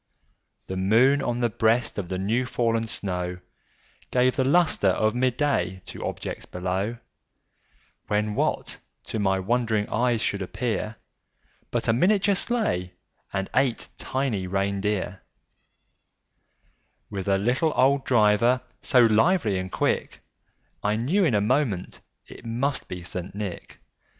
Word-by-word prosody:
The 95 - -5
moon 115 +9 +4
on 120 0 -1
the 120 - +2
breast 115 +1 +1
of 90 -4 -5
the 95 - -2
new 115 +7 0
fallen 115 -2 0
snow 90 -4 -3 0.7
Gave 125 0 +2
the 130 - +2
lustre 155 - +3
of 110 +3 +2
mid 125 0 0
day 95 -11 0
to - - -8
objects - - -5
below, 95 +5 -2 1.1
When, 105 0 0
what - - -1 0.2
to 110 - -4
my 95 -2 +2
wondering 110 +1 0
eyes 120 0 +1
should 100 -1 -1
appear, 110 +2 -3 0.7
But - - -2
a 115 - +4
miniature 200 - +3
sleigh, 195 - -1 0.4
and 95 -1 -2
eight 130 -4 +1
tiny 125 -9 -1
reindeer, 100 0 -1 1.9
With 95 -1 -4
a 100 -1 +3
little 125 +10 +1
old 135 +1 +3
driver, 120 +2 +3 0.2
so 125 -3 +5
lively 115 - +3
and 95 0 -5
quick, - - -1 0.6
I 105 +1 +1
knew 145 - +1
in 130 -9 +2
a 100 - +3
moment 110 -5 0 0.2
it - - -13
must 125 +5 -2
be 90 -1 -6
St. 90 +2 -5
Nick. 100 -4 -6
110 Hz, 135 wpm, -25 LUFS, 95-125 Hz, 1.9 s, so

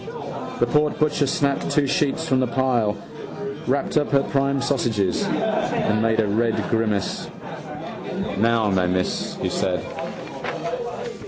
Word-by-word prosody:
The 120 - +5
porkbutcher 150 +1 +2
snapped 140 +1 +1
two 150 - +3
sheets 145 +3 +1
from 130 -3 +3
the 130 - +2
pile, 120 -4 +1 0.7
wrapped - - +1
up 145 - +2
her 140 -1 +4
prime 140 0 +1
sausages 120 -9 +1
and 110 0 +1
made 115 0 +2
a 110 - +4
red 110 +3 +2 0.2
grimace. 110 -3 0 1.1
—Now, 115 0 +3
my 90 -1 +2
miss, 90 0 0
he - - -1
said. - - 0
120 Hz, 120 wpm, -23 LUFS, 110-140 Hz, 1.1 s, The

